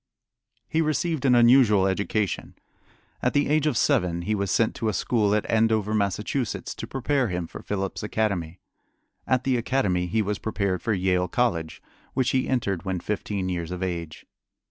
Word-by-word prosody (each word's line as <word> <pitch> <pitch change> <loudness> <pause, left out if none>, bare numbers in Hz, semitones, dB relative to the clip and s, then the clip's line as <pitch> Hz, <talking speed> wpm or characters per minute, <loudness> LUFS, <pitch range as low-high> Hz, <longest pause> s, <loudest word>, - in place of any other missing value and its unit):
He 160 - +1
received 155 -1 0
an 125 -2 +5
unusual 120 -5 +6
education. 100 +1 -1 0.7
At 125 - +1
the 145 0 +2
age 155 +1 +2
of 140 -6 +1
seven 85 -3 +1
he 110 - -1
was 100 -2 -1
sent 115 +3 +2
to 115 -3 0
a - - -1
school 105 +1 +1
at 105 - -1
Andover, 110 -1 +2
Massachusetts, 105 +4 -1
to - - -7
prepare 135 0 0
him 90 -3 -3
for - - -9
Phillips 95 -2 -3
Academy. 100 -6 -2 0.7
At 130 -1 +2
the 130 -1 +1
academy 105 -8 0
he 110 +5 +1
was 105 0 -2
prepared 100 -5 -1
for 110 - 0
Yale 90 -1 +1
College, 90 -11 -1 0.3
which 130 -2 +2
he 130 -1 0
entered 100 -9 -1
when 95 -2 -2
fifteen 100 0 -3
years 85 -3 -3
of 90 +1 -4
age. 85 -3 -5
105 Hz, 170 wpm, -25 LUFS, 95-125 Hz, 0.7 s, unusual